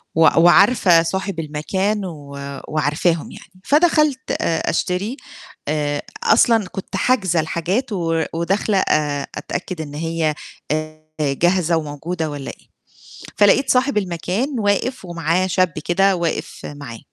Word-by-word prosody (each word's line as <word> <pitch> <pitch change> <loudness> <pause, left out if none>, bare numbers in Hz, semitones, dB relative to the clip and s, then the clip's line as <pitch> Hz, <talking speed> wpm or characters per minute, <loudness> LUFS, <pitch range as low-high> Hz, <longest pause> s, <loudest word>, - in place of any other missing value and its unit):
و 165 - +2
وعارفة 175 +2 +6
صاحب 190 0 -3
المكان 190 +7 -2
و 150 -5 -9 0.4
وعارفاهم 155 +2 0
يعني، 185 0 -15
فدخلت 305 - +3 0.2
آآ 165 -1 0
أشتري 190 +9 -1 0.5
آآ 145 -1 -1 0.2
أصلًا 225 -2 +4
كنت 190 +1 -7
حاجزة 190 -9 +2
الحاجات 175 +10 -1
و 165 -3 0
وداخلة 195 +5 0
آآ 145 -2 0
أتأكد 180 -2 -5
إن 145 -2 -7
هي 165 0 -1 0.4
آآ 155 0 -3 0.2
جاهزة 170 +4 +2
وموجودة 160 +2 -4
والّا 145 -2 -6
إيه، - - -20 0.7
فلقيت 215 +6 +4
صاحب 255 0 +2
المكان 200 - -2
واقف 205 +3 0
ومعاه 170 +1 0
شاب 185 -2 +1
كده 195 +2 +3
واقف 170 -2 -3
معاه، 140 -6 -8
175 Hz, 125 wpm, -20 LUFS, 155-200 Hz, 0.7 s, وعارفة